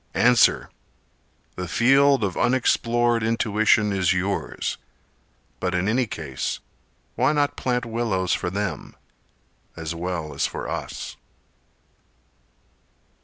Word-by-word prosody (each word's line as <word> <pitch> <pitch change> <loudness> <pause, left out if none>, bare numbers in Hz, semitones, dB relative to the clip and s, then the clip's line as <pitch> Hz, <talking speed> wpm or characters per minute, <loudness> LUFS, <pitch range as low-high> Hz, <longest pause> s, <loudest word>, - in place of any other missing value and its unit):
Answer! 125 -1 +4 0.9
The 90 0 -4
field 135 +5 +4
of 95 -2 -1
unexplored 120 -2 +2
intuition 110 -1 +2
is 95 -1 +2
yours. 95 +2 -2 0.8
But 90 0 -1
in 90 +2 0
any 120 +3 +1
case 80 -10 -4 0.5
why - - +2
not 145 -1 +1
plant 125 -1 -1
willows 110 -6 -1
for - - -1
them, 100 0 -4 0.8
As 80 0 -5
well 85 -2 -4
as - - 0
for - - -6
us? - - -5
105 Hz, 105 wpm, -24 LUFS, 90-120 Hz, 0.9 s, Answer